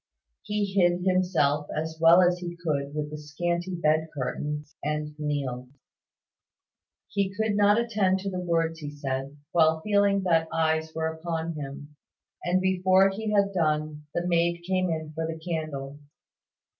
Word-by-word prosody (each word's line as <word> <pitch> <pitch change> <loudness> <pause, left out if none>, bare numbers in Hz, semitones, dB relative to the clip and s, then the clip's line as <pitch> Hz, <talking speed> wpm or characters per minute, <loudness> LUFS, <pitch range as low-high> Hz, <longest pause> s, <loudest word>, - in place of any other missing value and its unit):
He 210 0 -1
hid 175 -2 +3
himself 170 -6 +2
as 160 +1 -3
well 170 +3 +8
as 180 0 +2
he 175 -1 -5
could 145 -4 -2
with 150 -1 -3
the 150 - -6
scanty 175 +4 -2
bed 160 -1 +2
curtains, 150 +3 -4
and 150 0 -2
kneeled. 135 -4 -3 1.4
He 200 -2 0
could 215 +1 -1
not 205 +1 +5
attend 205 -5 +1
to 195 0 -3
the 185 - -3
words 165 -2 0
he 150 -2 -5
said, 140 -1 -4
while 160 -1 +4
feeling 200 0 +2
that 165 -3 +2
eyes 160 0 +1
were 160 0 -1
upon 165 0 -3
him; 145 0 -8 0.5
and 180 +1 +2
before 190 +1 +4
he 215 +3 -4
had 200 -1 +2
done, 155 -3 -1
the 175 - 0
maid 170 0 +1
came 185 -1 +1
in 160 -1 -3
for 160 +1 -2
the 165 0 -4
candle. 155 -4 -4
165 Hz, 155 wpm, -27 LUFS, 150-185 Hz, 1.4 s, well